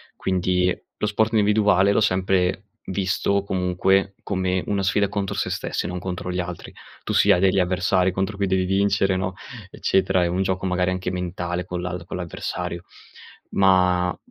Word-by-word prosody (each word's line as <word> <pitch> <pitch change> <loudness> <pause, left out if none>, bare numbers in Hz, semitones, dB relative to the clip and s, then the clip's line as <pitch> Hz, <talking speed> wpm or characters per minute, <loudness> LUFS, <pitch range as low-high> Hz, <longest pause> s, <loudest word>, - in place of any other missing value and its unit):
Quindi, 90 -1 +1 0.2
lo - - -1
sport 110 +2 +1
individuale 105 -2 +4
l'ho 100 - +2
sempre 95 -1 +1 0.2
visto, 95 +1 0
comunque, 95 +1 +1
come 95 -2 -1
una 100 -1 0
sfida 100 +1 +1
contro 100 -1 -3
se - - -1
stessi - - -3
e - - -3
non 90 0 -4
contro 90 0 -4
gli 90 - -2
altri. 90 -1 -6 0.3
Tu - - -4
sì, 105 - +5
hai 90 -2 +4
degli 95 0 +3
avversari 90 0 +1
contro 95 +2 -2
cui 100 -1 0
devi 95 0 +1
vincere, 95 0 +2
no, 95 0 -2 0.4
eccetera. 95 -1 +1
È - - +1
un 90 +2 0
gioco, 95 0 -2
magari 90 0 +1
anche 90 0 -3
mentale 90 -1 -3
con 90 -1 -4
l'al 90 -1 -5
con - - -6
l'avversario. 90 0 -5 0.7
Ma 90 -2 +3
95 Hz, 170 wpm, -23 LUFS, 90-95 Hz, 0.7 s, sì